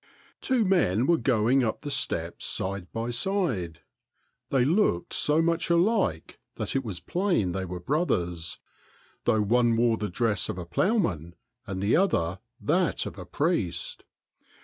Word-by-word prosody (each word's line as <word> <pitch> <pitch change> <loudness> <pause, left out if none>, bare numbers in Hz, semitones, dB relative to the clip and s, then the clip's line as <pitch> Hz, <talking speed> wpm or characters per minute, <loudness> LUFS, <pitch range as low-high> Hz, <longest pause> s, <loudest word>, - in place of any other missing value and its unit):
Two 255 -4 +2
men 130 - +2
were 170 - +4
going 125 +1 +3
up 110 - -2
the 145 - -5
steps 85 -9 -2
side 95 -1 -3
by 115 +1 -3
side. 120 - -1 0.7
They 130 -3 +3
looked 160 - +1
so 155 +2 +2
much 170 0 0
alike 170 - +1 0.2
that - - -3
it 135 - +1
was 105 -7 -4
plain 175 - 0
they 95 +1 -3
were 90 0 -6
bro 150 - 0
thers, 85 - -2 0.7
though 110 -1 +3
one 120 +2 +3
wore 115 -1 +3
the 105 -1 -3
dress 105 -1 0
of - - -3
a 90 - -5
ploughman 85 - 0 0.3
and 95 0 -4
the 100 - +3
other 95 - +1 0.2
that - - +1
of - - -7
a - - -8
priest. 125 - -1
115 Hz, 155 wpm, -27 LUFS, -, 0.7 s, were